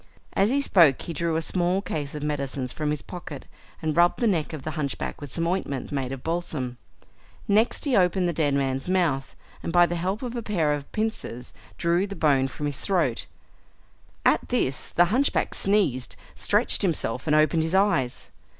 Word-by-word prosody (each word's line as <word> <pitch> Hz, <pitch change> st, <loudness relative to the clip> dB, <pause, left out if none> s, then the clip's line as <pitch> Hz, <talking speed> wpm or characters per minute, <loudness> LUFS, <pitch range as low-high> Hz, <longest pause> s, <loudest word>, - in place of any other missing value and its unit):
As 195 Hz, +2 st, +3 dB
he 280 Hz, +3 st, +2 dB
spoke 170 Hz, -, +5 dB
he 170 Hz, -, -5 dB
drew 165 Hz, +1 st, -1 dB
a 160 Hz, -, 0 dB
small 180 Hz, +2 st, +1 dB
case 150 Hz, -7 st, -4 dB
of 150 Hz, -, -5 dB
medicines 140 Hz, -3 st, -2 dB
from 150 Hz, -1 st, -2 dB
his 150 Hz, -1 st, -2 dB
pocket 165 Hz, -6 st, -8 dB, 0.4 s
and 155 Hz, -1 st, 0 dB
rubbed 175 Hz, +1 st, +4 dB
the 240 Hz, -, +1 dB
neck 175 Hz, -9 st, +1 dB
of 155 Hz, -4 st, -7 dB
the 155 Hz, -, -3 dB
hunchback 150 Hz, -3 st, -4 dB
with 145 Hz, -3 st, -7 dB
some 165 Hz, -, -1 dB
ointment 170 Hz, -7 st, -2 dB
made 135 Hz, -3 st, -2 dB
of 135 Hz, -2 st, -6 dB
balsam. 155 Hz, -7 st, -3 dB, 0.7 s
Next 215 Hz, +8 st, +2 dB
he 275 Hz, -4 st, +2 dB
opened 180 Hz, -1 st, +3 dB
the 175 Hz, -, 0 dB
dead 150 Hz, -3 st, +1 dB
man's 135 Hz, 0 st, -1 dB
mouth, 170 Hz, -8 st, 0 dB, 0.3 s
and -, -, -3 dB
by 175 Hz, +1 st, +6 dB
the 175 Hz, -, -3 dB
help 185 Hz, +7 st, -2 dB
of 245 Hz, -1 st, -4 dB
a 240 Hz, -, -2 dB
pair 170 Hz, -9 st, +1 dB
of 145 Hz, -1 st, -5 dB
pincers 215 Hz, -, -3 dB, 0.2 s
drew 175 Hz, +3 st, +1 dB
the 200 Hz, -, -7 dB
bone 140 Hz, -6 st, +3 dB
from 145 Hz, +3 st, -6 dB
his 145 Hz, -2 st, -2 dB
throat. 165 Hz, -12 st, 0 dB, 1.0 s
At -, -, +3 dB
this 130 Hz, -, 0 dB
the 175 Hz, -, +3 dB
hunchback 275 Hz, +3 st, +1 dB
sneezed, 190 Hz, -12 st, +1 dB, 0.2 s
stretched -, -, +2 dB
himself 145 Hz, -, -1 dB
and 150 Hz, -, +3 dB
opened 155 Hz, +1 st, +4 dB
his 160 Hz, +3 st, -1 dB
eyes. 190 Hz, -11 st, +1 dB
160 Hz, 190 wpm, -25 LUFS, 140-185 Hz, 1.0 s, by